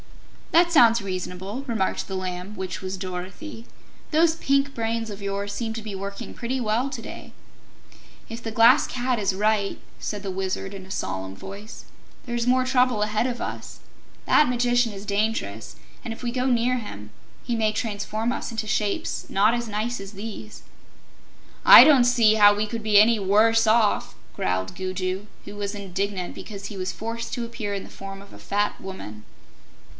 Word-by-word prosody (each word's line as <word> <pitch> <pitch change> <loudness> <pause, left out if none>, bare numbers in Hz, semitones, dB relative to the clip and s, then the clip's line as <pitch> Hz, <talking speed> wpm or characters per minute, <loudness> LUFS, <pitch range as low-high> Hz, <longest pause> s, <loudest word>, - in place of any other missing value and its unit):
"That 345 +1 +5
sounds 235 -8 +6
reasonable," 190 +5 -5
remarked 220 -6 -1
the 190 - -4
Lamb, 185 +2 -5
which 185 -1 -5
was 190 0 -4
Dorothy. 190 - -7 0.4
"Those 325 +1 +3
pink 275 -3 +1
brains 225 -1 -2
of 200 0 -8
yours 200 0 -3
seem 225 0 -3
to 225 - -5
be 215 -2 -7
working 200 +4 -6
pretty 255 +2 -3
well 235 +3 0
to - - -6
day." - - -10 0.9
"If 230 +1 -7
the 225 - -5
Glass 230 +5 +6
Cat 250 0 -1
is 195 -2 0
right," 210 0 +1 0.2
said 205 -1 -4
the 195 - -3
Wizard 190 +1 -3
in 190 -1 -8
a 190 - -11
solemn 95 - -4
voice, 200 - -10 0.4
"there's 240 -1 -2
more 255 +1 +3
trouble 250 -4 +2
ahead 215 +3 0
of 245 -1 -3
us. - - -6 0.5
That 300 - +5
Magician 245 -1 +2
is 200 0 -9
dangerous, 200 - -2 0.3
and 230 - -5
if 225 - -7
we 240 - -1
go 250 +1 -1
near 250 0 +2
him 105 - -9 0.3
he 240 - -2
may 220 -1 +2
transform 215 +1 -2
us - - -4
into 225 -1 -3
shapes 210 -1 -1
not 205 +4 +3
as 240 -1 -2
nice 215 +2 -2
as 195 +1 -9
these." 215 +1 -8 1.0
"I - - +11
don't 275 -5 +6
see 235 -3 +4
how 205 -1 +7
we 210 +1 0
could 225 +1 -5
be 210 -2 +5
any 225 +1 +5
WORSE 220 +3 +4
off," 220 -1 +2 0.2
growled 95 0 -2
Gugu, 185 +1 -3 0.2
who 205 - -9
was 205 0 -4
indignant 195 -1 -3
because 200 -2 -8
he 210 - -6
was 185 -1 -3
forced 230 +1 -5
to 240 -2 -3
appear 230 -3 -4
in 195 - -4
the - - -12
form 195 0 -9
of 200 - -15
a - - -12
fat 205 +1 -1
woman. 110 - -8
215 Hz, 180 wpm, -24 LUFS, 195-235 Hz, 1.0 s, I